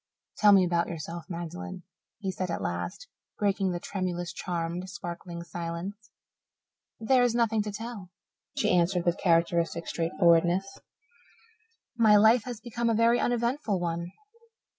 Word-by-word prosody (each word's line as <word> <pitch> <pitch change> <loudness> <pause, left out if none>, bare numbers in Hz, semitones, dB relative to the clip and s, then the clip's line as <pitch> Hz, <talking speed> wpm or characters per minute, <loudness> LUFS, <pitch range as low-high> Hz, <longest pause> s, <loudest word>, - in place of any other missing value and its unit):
"Tell 210 -1 +6
me 195 -2 +6
about 170 -1 +1
yourself, 165 0 -6
Magdalen," 170 - -6 0.3
he 195 -3 -3
said 185 0 -4
at 165 - -3
last, 90 - -4 0.3
breaking 200 -2 +1
the 175 - -3
tremulous, 175 -2 -3
charmed, 175 +1 -3
sparkling 175 -3 -7
silence. 175 +5 -6 0.9
"There 250 +3 +3
is 245 -1 +2
nothing 225 -2 +2
to 210 0 -4
tell," 215 -3 -7 0.5
she - - +2
answered 175 0 +2
with 175 -1 +1
characteristic 170 -1 +1
straightforwardness. 175 +2 +2 1.2
"My 220 -3 +5
life 220 +3 +5
has 245 -3 -6
been 235 +1 -2
a 225 - +2
very 230 +2 +4
uneventful 240 -3 0
one. 170 0 -3
185 Hz, 135 wpm, -28 LUFS, 170-215 Hz, 1.2 s, Tell